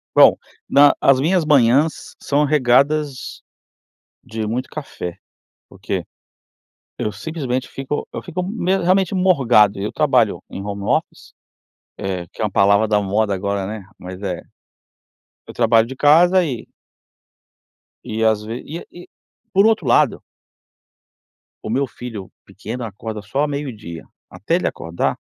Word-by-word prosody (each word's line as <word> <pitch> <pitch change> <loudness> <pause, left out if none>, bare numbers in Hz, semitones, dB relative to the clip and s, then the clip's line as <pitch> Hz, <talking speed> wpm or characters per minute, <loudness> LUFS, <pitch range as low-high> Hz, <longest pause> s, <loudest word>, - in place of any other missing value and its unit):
Bom, - - +8 0.3
na 145 0 +6
as 135 -1 +4
minhas 165 +3 +2
manhãs 140 +2 +2
são 145 +1 +1
regadas 140 0 +1 0.8
de 110 -1 -5
muito 125 +4 -3
café, 90 - -7 0.5
porque - - -4 0.9
eu 105 - -2
simplesmente 130 0 -4
fico 135 +2 -4
eu - - -5
fico 180 0 -4
me 190 -1 0
realmente 185 +1 +2
morgado. 125 - +4
Eu 105 +2 -3
trabalho 125 -8 +2
em 95 - -6
home 100 -1 -5
office, - - -2 0.7
eh, 90 -3 -4
que - - -9
é - - +2
uma 105 - -3
palavra 100 +3 +4
da 105 -1 +2
moda 100 +1 0
agora, 100 0 -2
né, 105 0 -6
mas 90 +1 -9
é, 90 -4 -3 1.1
eu - - -9
trabalho 115 -1 +3
de 130 - -7
casa 170 +6 +5
e 130 -8 -4 1.4
e 110 +1 -3
às 110 -1 +2
ve 115 +3 -6
e 165 +4 -7 0.2
e - - -19 0.4
por 195 +2 +5
outro 215 - +2
lado 120 - +3 1.4
o - - -5
meu 135 +5 +1
filho 115 -6 -8
pequeno 120 +4 -7
acorda 110 +1 -7
só 105 +7 -4
ao 150 - +2
meio-dia. 115 - -6 0.2
Até - - -2
ele - - 0
acordar, 80 +1 -2
120 Hz, 140 wpm, -20 LUFS, 105-150 Hz, 1.4 s, Bom